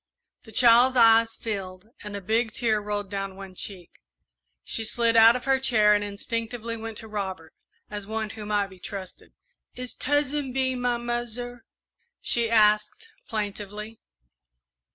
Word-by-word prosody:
The 220 - -13
child's 245 +3 +6
eyes 225 -1 +5
filled 195 -2 -5
and 210 -1 -6
a 200 - -5
big 220 +3 0
tear 220 -3 +1
rolled 205 -1 -4
down 195 -1 -4
one 195 -1 -10
cheek. 185 -2 -7 0.7
She 225 - 0
slid 230 +1 +1
out 225 +1 +8
of 250 - -4
her 270 -1 +3
chair 215 -5 +4
and 205 0 +1
instinctively 230 +3 -4
went 225 -1 -7
to 220 - -9
Robert, 190 -6 -5 0.4
as 205 -1 -5
one 220 -1 -3
who 215 -2 -8
might 205 -2 0
be 190 - -14
trusted. 190 0 -8 0.4
"Is 250 0 -5
Tuzzin 290 -1 -1
Bee 260 0 +1
my 245 -1 0
muzzer?" 240 0 -4 0.5
she 235 -1 +1
asked 215 - +3 0.2
plaintively. 210 +1 -5
220 Hz, 150 wpm, -26 LUFS, 205-240 Hz, 0.7 s, out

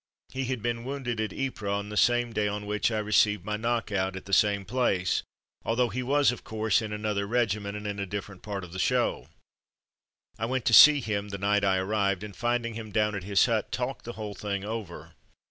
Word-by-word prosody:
He 130 0 -3
had 125 -3 -3
been 120 -1 -2
wounded 125 -4 -3
at 110 -2 -2
Ypres 130 -5 -3
on 100 +1 -2
the 105 - -6
same 120 +1 +2
day 105 -1 +1
on 105 0 -4
which 105 +2 0
I 110 - -2
received 105 0 +2
my 105 0 -2
^* - - -11
knock 115 0 -1
out'^ 95 -1 -1
at 95 - -8
the 100 - -7
same 100 0 +3
place, 100 -5 +1 0.4
although 120 +2 +1
he 125 +5 -3
was, 140 +2 +3
of 125 - -8
course, 110 -1 +1
in 110 -1 -5
another 105 -1 -2
regiment 105 -3 -1
and 105 - -8
in 100 -1 -3
a 100 - -3
different 100 -1 -6
part 100 -2 -5
of 90 -1 -10
the 95 - -5
show. - - +1 1.1
I 110 - -1
went 130 -1 -2
to 115 - +2
see 145 +5 +9
him 105 -3 -3
the 100 - -5
night 100 +1 +1
I 95 -1 +3
arrived, 100 0 0
and 105 -3 -8
finding 120 +3 -1
him 110 -1 -7
down 105 +1 +1
at 100 -3 -4
his 100 -2 +4
hut, - - -1
talked - - -3
the 120 - -6
whole 105 -2 -6
thing 100 -1 -4
over. 110 -5 -6
105 Hz, 230 wpm, -28 LUFS, 100-115 Hz, 1.1 s, see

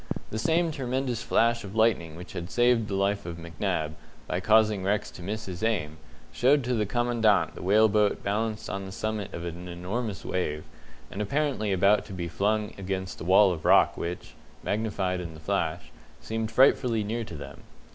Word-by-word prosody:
The 110 - -3
same 165 +5 +2
tremendous 130 -3 -2
flash 115 0 +2
of 100 +1 -8
lightning 105 -8 +2
which 90 +2 -10
had 85 0 -5
saved 120 -2 +3
the 100 - -3
life 100 -1 0
of 85 -1 -5
McNab, 85 -1 -2 0.3
by 90 - -2
causing 105 0 +3
Rex 105 +2 0
to - - -11
miss 105 +5 -4
his 90 -2 -7
aim, 95 -9 -1 0.4
showed 135 +3 +3
to 125 +1 -1
the 105 -3 0
Commandant 120 -3 +2
the - - -9
whale 105 +4 +5
boat 105 0 +1
balanced 110 +2 -2
on 95 0 -4
the - - -8
summit 110 0 -3
of 85 - -6
an 85 +1 -6
enormous 95 +5 -4
wave, 75 -4 -2 0.5
and 100 - -4
apparently 130 -2 0
about 100 +3 +4
to - - -9
be 85 -2 -4
flung 105 +4 0
against 95 -1 -4
the - - -6
wall 95 +2 +6
of 80 - -7
rock - - +5
which 85 +1 -5 0.3
magnified 100 -4 -1
in 85 -2 -7
the - - -11
flash 80 - -2 0.3
seemed 110 0 -3
frightfully 120 -2 +4
near 115 +3 -2
to 85 - -8
them. 70 -2 -9
105 Hz, 185 wpm, -27 LUFS, 90-115 Hz, 0.5 s, wall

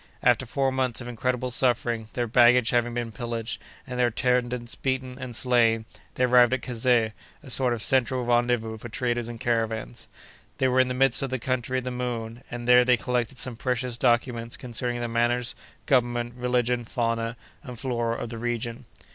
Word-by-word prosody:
After 125 +1 +3
four 135 +2 0
months 130 -2 -1
of 120 - -7
incredible 125 +1 -2
suffering, 120 -3 +1
their 120 - -1
baggage 120 0 +5
having 120 -1 +1
been 120 -1 -3
pillaged, 115 0 -5 0.2
and 125 -1 -6
their 125 - +4
attendants 125 0 0
beaten 130 -1 -2
and 130 -2 -6
slain, 115 -3 +3 0.3
they 130 - 0
arrived 125 0 +5
at 130 - -7
Kazeh, 120 -2 +1 0.3
a 140 - -11
sort 125 -1 +2
of 115 -2 0
central 130 -2 +2
rendezvous 120 -2 +1
for 120 - -8
traders 120 0 -2
and 115 -1 -8
caravans. 115 - -2 0.5
They 130 - +2
were 130 0 +2
in 130 - +4
the 125 - -3
midst 135 -1 +3
of 135 - -2
the 130 - -1
country 130 +1 -2
of 130 - -2
the 125 - -4
Moon, 120 -2 -4
and 120 0 -6
there 125 0 +7
they 125 0 +3
collected 125 +2 -2
some 125 -1 +2
precious 125 0 -1
documents 120 0 0
concerning 120 0 -1
the 120 - -2
manners, 120 +1 0 0.3
government, 120 -2 +1
religion, 125 -1 0
fauna, 115 0 -2 0.2
and 125 -5 -9
flora 120 -2 -2
of 120 - -5
the 115 -1 -7
region. 120 0 -3
120 Hz, 185 wpm, -26 LUFS, 115-125 Hz, 0.5 s, there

